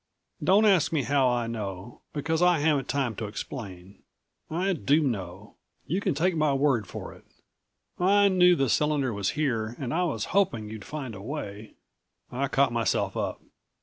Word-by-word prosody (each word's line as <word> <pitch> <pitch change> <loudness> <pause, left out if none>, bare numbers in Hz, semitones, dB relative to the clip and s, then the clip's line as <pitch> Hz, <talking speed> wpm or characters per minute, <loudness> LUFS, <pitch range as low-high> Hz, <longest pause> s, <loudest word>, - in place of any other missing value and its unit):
"Don't 200 +4 +5
ask 190 -7 +4
me 155 -4 +1
how 140 -2 +2
I 120 -1 0
know, 105 -2 -6
because 155 +3 -1
I 180 -1 +5
haven't 145 -3 +1
time 130 -5 -1
to 110 - -3
explain. 100 -4 -8 0.5
I 185 +5 0
do 155 -1 +2
know 100 -6 -4 0.3
you 185 +6 -1
can 185 -7 0
take 175 +4 +1
my 155 -3 +2
word 135 -7 +1
for - - -7
it. - - -17 0.8
I 200 +3 +5
knew 180 -2 +5
the 135 -4 +1
cylinder 145 -1 +1
was 100 -2 -1
here, 115 -6 -1
and 125 -3 -4
I 180 +2 +1
was 115 - -2
hoping 115 - +1
you'd 110 -3 -8
find 140 -6 -6
a 95 - -9
way 110 -4 -6 0.3
" - - -54 0.3
I 135 +3 -1
caught 135 -2 +2
myself 115 -5 0
up. - - -3
135 Hz, 180 wpm, -27 LUFS, 110-160 Hz, 0.8 s, Don't